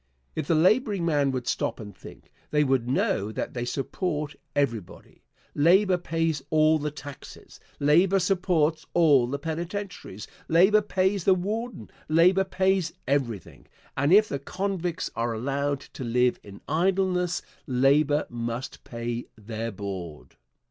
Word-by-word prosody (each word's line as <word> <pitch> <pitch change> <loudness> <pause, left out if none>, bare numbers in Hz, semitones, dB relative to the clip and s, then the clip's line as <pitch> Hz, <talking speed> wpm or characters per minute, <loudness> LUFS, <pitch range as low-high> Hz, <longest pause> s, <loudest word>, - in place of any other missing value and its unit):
If - - -3
the 165 - +3
laboring 200 +2 +3
men 145 -4 +2
would 130 -2 -3
stop - - -2
and 105 -2 -9
think, - - -14 0.2
they 150 0 +3
would 130 -3 +1
know 105 -5 0
that - - -4
they 120 -1 -3
support 150 +2 -3 0.2
everybody. 115 -9 -3 0.3
Labor 180 +5 +4
pays 165 -3 -1
all 155 0 +4
the 150 +1 -2
taxes. 145 -2 -11 0.2
Labor 175 +7 +4
supports 175 -5 +1
all 145 -8 +5
the 140 +3 -2
penitentiaries. 170 - -5 0.2
Labor 190 +6 +5
pays 190 -1 0
the 190 - +5
warden. 220 +6 -4 0.2
Labor 180 +5 +5
pays 190 -2 +1
everything, 125 - -2 0.3
and 140 +4 +1
if 210 +3 +6
the 140 - -3
convicts 180 +2 -3
are 115 0 -1
allowed 140 +4 -1
to 130 - -9
live 125 +1 +1
in 100 -1 -13
idleness 180 +2 +1 0.2
labor 140 +3 +3
must 120 +1 -5
pay 120 0 -5
their 110 +1 -5
board. 95 -6 -7
150 Hz, 135 wpm, -26 LUFS, 125-180 Hz, 0.3 s, if